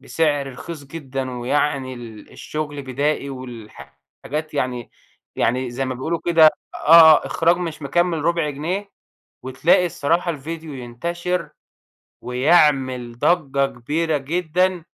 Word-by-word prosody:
بسعر 145 -4 -1
رخيص 150 +3 -8
جدًا 135 -3 -5
ويعني 135 0 0
ال 115 -3 -11
الشغل 150 -2 -5
بدائي 140 +2 -1
والحاجات 115 - -8
يعني 125 -2 -2 0.5
يعني 125 +1 0
زي 135 +2 -3
ما 130 - -3
بيقولوا 160 +7 -3
كده 165 -2 +5 0.3
آه - - -7
آه 160 -1 +8
إخراج 170 +1 +2
مش 165 -4 -5
مكمّل 165 +2 0
ربع 170 -3 +1
جنيه، 180 +8 -4 0.5
وتلاقي 130 +8 +2
الصراحة 170 +2 0
الفيديو 160 +1 -6
ينتشر 170 +9 -4 0.7
ويعمل 130 -3 +2
ضجّة 140 -5 +2
كبيرة 150 +6 -2
جدًا، 175 +4 -1
145 Hz, 115 wpm, -21 LUFS, 130-165 Hz, 0.7 s, آه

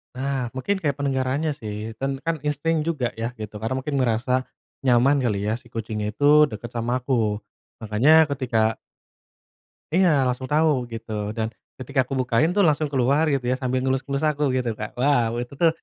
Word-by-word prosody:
Nah, 135 -1 -2
mungkin 195 +10 -1
kayak 145 -6 -1
pendengarannya 135 +2 0
sih 110 -6 -6
dan 135 0 -2
kan 165 -1 -1
insting 155 +3 0
juga 135 -8 -1
ya 115 +2 -3
gitu. 110 -2 -7
Karena 110 +4 -2
mungkin 140 0 -2
merasa 125 +2 +1 0.4
nyaman 130 +3 +4
kali 105 -6 0
ya - - +1
si 130 - -20
kucing 110 -1 -4
itu 145 +8 +5
deket 115 -1 -7
sama 120 +2 -1
aku. 110 -5 0 0.4
Makanya 145 +9 +5
ketika 115 -5 0 1.2
Iya, 185 0 +5 0.2
langsung 125 +1 -3
tahu 160 +1 +4 0.2
gitu 115 0 -7 0.3
dan 110 - 0 0.3
ketika 135 +1 -3
aku 130 - -7
bukain 125 +6 +2
tuh 205 - +4
langsung 150 0 +1
keluar 135 +3 +2
gitu 135 -3 -1
ya, - - +2
sambil 130 0 0
ngelus-ngelus 135 +2 -1
aku 150 0 -2
gitu, 125 -2 0
Kak. 105 0 -4
Wow 125 -5 +3
itu 120 +2 -8
tuh 170 - +6
130 Hz, 175 wpm, -24 LUFS, 115-145 Hz, 1.2 s, tuh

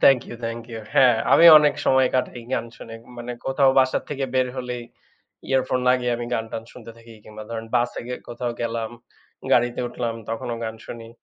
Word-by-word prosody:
Thank 135 -2 +7
you, 120 - -7
thank 115 0 -4
you. 110 - -5
হ্যাঁ, 125 -3 +6 0.2
আমি 170 - +8
অনেক 150 -1 +3
সময় 130 -1 +4
কাটাই 125 -1 -1
গান 115 - 0
শুনে 115 - -10 0.2
মানে 120 +1 -6
কোথাও 135 0 +4
বাসা 130 -1 +3
থেকে 140 -2 -2
বের 130 -1 +3
হলেই 125 -1 -4 0.7
earphone 130 -1 +1
লাগিয়ে 125 -1 +2
আমি 120 0 -5
গান 110 - -1
টান 110 - -4
শুনতে 115 -2 -11
থাকি 115 0 -15
কিংবা 110 0 -10
ধরেন 115 -1 -5
বাসে 120 0 -1
গে 125 - -2
কোথাও 120 0 -4
গেলাম, 115 -1 -2 0.6
গাড়িতে 120 0 +2
উঠলাম 120 -1 -3 0.2
তখনও 115 +1 -3
গান 110 0 -4
শুনি 115 -1 -8
120 Hz, 185 wpm, -23 LUFS, 115-130 Hz, 0.7 s, আমি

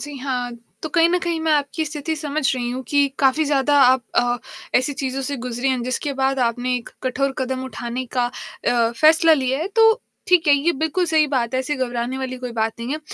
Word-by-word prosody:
जी 290 -1 -7
हाँ, 250 -2 -3 0.3
तो 315 - -3
कहीं 330 +2 +4
न 360 +1 +2
कहीं 340 -1 -2
मैं 320 -1 +1
आपकी 295 +2 0
स्थिति 305 +1 -4
समझ 300 -1 -3
रही 240 -1 -3
हूँ 255 +1 -4
कि 285 -1 +3
काफ़ी 275 +3 +3
ज़्यादा 285 0 +2
आप 255 0 +5
अ, 245 0 +2 0.4
ऐसी 255 +3 -2
चीज़ों 270 -1 -3
से 280 +2 -3
गुज़री 245 +1 -3
हैं, 260 -2 0
जिसके 255 +4 -2
बाद 270 0 +1
आपने 245 +1 0
एक 240 - -8
कठोर 270 +1 0
कदम 260 0 -2
उठाने 250 -1 -5
का 245 - +3 0.4
अ, 235 -2 +2
फ़ैसला 320 +6 +5
लिया 265 -3 +1
है। 330 +6 -2
तो, 445 0 +6 0.3
ठीक 360 -2 +4
है, 290 - +7
ये 290 +5 +1
बिल्कुल 320 +5 0
सही 315 -2 +3
बात 255 -3 -1
है, 260 - +2
ऐसी 280 +3 -2
घबराने 245 0 -2
वाली 260 -1 -4
कोई 250 -1 -6
बात 225 -1 0
नहीं 240 +3 -3
है, 305 - -2
265 Hz, 225 wpm, -21 LUFS, 250-300 Hz, 0.4 s, है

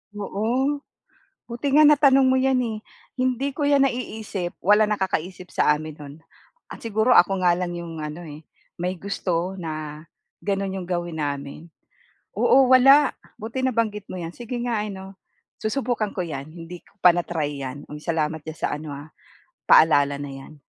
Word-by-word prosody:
Oo, 235 +8 -1 0.7
buti 255 +4 -2
nga 305 +2 +7
natanong 275 -3 +5
mo 260 - +3
'yan, 260 0 +2
eh. 225 -3 -3 0.4
Hindi 255 +1 0
ko 295 - -1
'yan 280 -1 +4
naiisip, 215 -7 -5
wala 210 +3 +5
nakakaisip 185 -3 -3
sa 150 - +3
amin 155 0 -6
no'n. 145 -1 -10 0.5
Ah, - - -8
siguro 225 +2 +2
ako 190 +2 +4
nga 175 -1 +3
lang 180 -1 -3
'yong 170 -1 -7
ano, 150 +3 -6
eh, 150 +1 -11 0.3
may 180 +1 -2
gusto 185 -1 -2
na 155 -3 -6 0.4
gano'n 195 -1 -1
'yong 185 - -5
gawin 175 -2 -3
namin. 140 -1 -4 0.8
Oo 265 -1 +5
wala, 270 +3 +7 0.2
buti 225 +4 -6
nabanggit 220 -5 -1
mo - - -7
'yan, 170 -2 -5
sige 240 +5 -7
nga 235 -3 -1
ano, 195 -2 -7 0.4
susubukan 220 -2 -2
ko 185 - -1
'yan. 140 -4 -6
Hindi 165 +2 -10
ko - - -26
pa 180 - +9
na-try 160 -4 -3
'yan. 135 +1 -6
Hmm, 150 - -8
salamat 160 -1 -1
do'n 155 +1 -8
sa - - -2
ano, 150 -1 -5
ah, 145 +2 -11 0.6
paalala 145 -3 +5
na 145 0 -6
'yan. 135 +2 -12
185 Hz, 165 wpm, -23 LUFS, 155-235 Hz, 0.8 s, pa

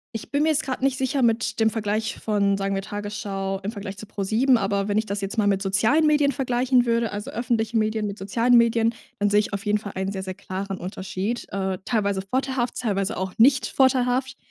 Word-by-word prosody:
ich 225 - -6
bin 285 +1 +2
mir 320 - +3
jetzt 315 0 +2
grade 260 -1 -4
nicht 270 -1 +2
sicher 265 +1 0
mit 230 -1 +1
dem 220 0 +4
Vergleich 215 0 -2
von, 200 -2 +1
sagen 195 0 -1
wir, 195 - -1
Tagesschau 200 -1 -4
im 205 - -2
Vergleich 200 -2 -7
zu 215 - -8
ProSieben, 220 +6 +2
aber 200 -1 0
wenn 205 0 0
ich 220 - +1
das 200 -1 -3
jetzt 195 +3 -4
mal 210 -2 +3
mit 195 -1 +2
sozialen 220 +11 +3
Medien 295 -2 +3
vergleichen 250 -1 +1
würde, 230 -1 +1
also, 205 +1 -5
öffentlichen 230 -1 -1
Medien 215 -1 0
mit 200 0 -6
sozialen 230 +5 +2
Medien, 230 0 +3 0.2
dann 205 0 +2
sehe 205 +1 +4
ich 210 - -6
auf 200 +2 -4
jeden 210 0 +2
Fall 205 -1 -7
einen 190 +1 -2
sehr, 190 -1 -4
sehr 190 0 -5
klaren 195 0 -5
Unterschied. 190 +4 -4
Äh, 190 -1 -2
teilweise 200 -4 0
vorteilhaft, 255 +3 -2
teilweise 205 -2 -1
auch 190 0 -3
nicht 255 +3 +5
vorteilhaft. 260 0 +2
215 Hz, 220 wpm, -24 LUFS, 200-245 Hz, 0.2 s, nicht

